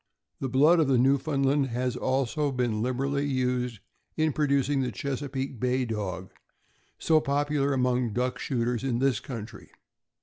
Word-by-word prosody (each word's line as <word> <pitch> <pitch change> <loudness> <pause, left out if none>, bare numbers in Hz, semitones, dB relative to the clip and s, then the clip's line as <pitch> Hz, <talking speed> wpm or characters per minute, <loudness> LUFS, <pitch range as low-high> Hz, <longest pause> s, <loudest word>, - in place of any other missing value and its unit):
The 135 - -2
blood 150 +7 +5
of 155 - +3
the 135 -2 +3
Newfoundland 135 +1 +2
has 125 +1 -2
also 135 +3 0
been 120 -4 -1
liberally 135 +3 -1
used 125 -4 -1 0.4
in 155 -2 +2
producing 140 -1 +1
the 125 -2 -1
Chesapeake 135 -2 -4
Bay 125 +1 +1
Dog, 95 -5 -4 0.7
so 160 -1 +3
popular 145 0 0
among 125 -3 +1
duck 125 +3 -1
shooters 120 -2 -1
in 130 -3 0
this 130 -3 +1
country. 115 -4 -8
130 Hz, 140 wpm, -27 LUFS, 125-140 Hz, 0.7 s, blood